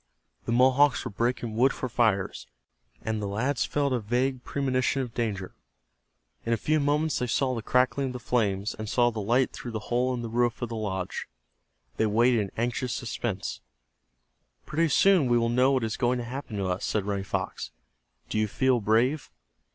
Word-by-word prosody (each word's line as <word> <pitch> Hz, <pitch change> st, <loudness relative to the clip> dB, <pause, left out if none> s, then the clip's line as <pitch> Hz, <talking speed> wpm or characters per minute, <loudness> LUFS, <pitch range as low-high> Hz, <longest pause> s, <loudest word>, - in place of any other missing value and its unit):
The -, -, -2 dB
Mohawks 130 Hz, +3 st, +4 dB
were 120 Hz, -, -4 dB
breaking 115 Hz, +1 st, -1 dB
wood 130 Hz, +4 st, +4 dB
for 130 Hz, -, -4 dB
fires, 110 Hz, -6 st, 0 dB, 0.6 s
and 110 Hz, -1 st, -2 dB
the 100 Hz, -, -2 dB
lads 125 Hz, +7 st, 0 dB
felt 140 Hz, -2 st, 0 dB
a 125 Hz, -, +1 dB
vague 125 Hz, +4 st, -1 dB
premonition 135 Hz, -1 st, 0 dB
of 120 Hz, -3 st, -8 dB
danger. 100 Hz, -6 st, -3 dB, 0.9 s
In 115 Hz, -, 0 dB
a -, -, +2 dB
few 155 Hz, +5 st, +1 dB
moments 150 Hz, +2 st, +1 dB
they 125 Hz, -, -1 dB
heard 130 Hz, +2 st, +1 dB
the 115 Hz, -, -3 dB
crackling 130 Hz, +4 st, +1 dB
of 125 Hz, -, -5 dB
the 125 Hz, -, -5 dB
flames, 105 Hz, -4 st, 0 dB
and 110 Hz, -1 st, -6 dB
saw 120 Hz, 0 st, +3 dB
the 110 Hz, -2 st, -4 dB
light 120 Hz, +6 st, +2 dB
through 120 Hz, -, -7 dB
the 110 Hz, +2 st, -5 dB
hole 125 Hz, +2 st, +2 dB
in 120 Hz, -, -5 dB
the -, -, -3 dB
roof 120 Hz, +1 st, 0 dB
of 120 Hz, -, -3 dB
the 115 Hz, -, -4 dB
lodge. 95 Hz, -4 st, -3 dB, 0.7 s
They 110 Hz, -, +2 dB
waited 120 Hz, +3 st, +3 dB
in 100 Hz, -2 st, -2 dB
anxious 120 Hz, +2 st, -1 dB
suspense. 115 Hz, -4 st, -4 dB, 1.0 s
"Pretty 165 Hz, +1 st, +1 dB
soon 180 Hz, 0 st, +4 dB
we 120 Hz, 0 st, +3 dB
will 115 Hz, 0 st, +1 dB
know 125 Hz, +3 st, +3 dB
what 130 Hz, -3 st, +1 dB
is 110 Hz, -1 st, -2 dB
going 125 Hz, 0 st, +1 dB
to 120 Hz, -, -3 dB
happen 125 Hz, -3 st, -6 dB
to 100 Hz, -, -1 dB
us," 90 Hz, +1 st, -2 dB
said 105 Hz, -3 st, -1 dB
Running 100 Hz, -1 st, -2 dB
Fox. -, -, -3 dB, 0.6 s
"Do 110 Hz, -, -1 dB
you 110 Hz, -, +2 dB
feel 125 Hz, +3 st, +1 dB
brave?" 120 Hz, +8 st, +1 dB
120 Hz, 195 wpm, -27 LUFS, 110-130 Hz, 1.0 s, Mohawks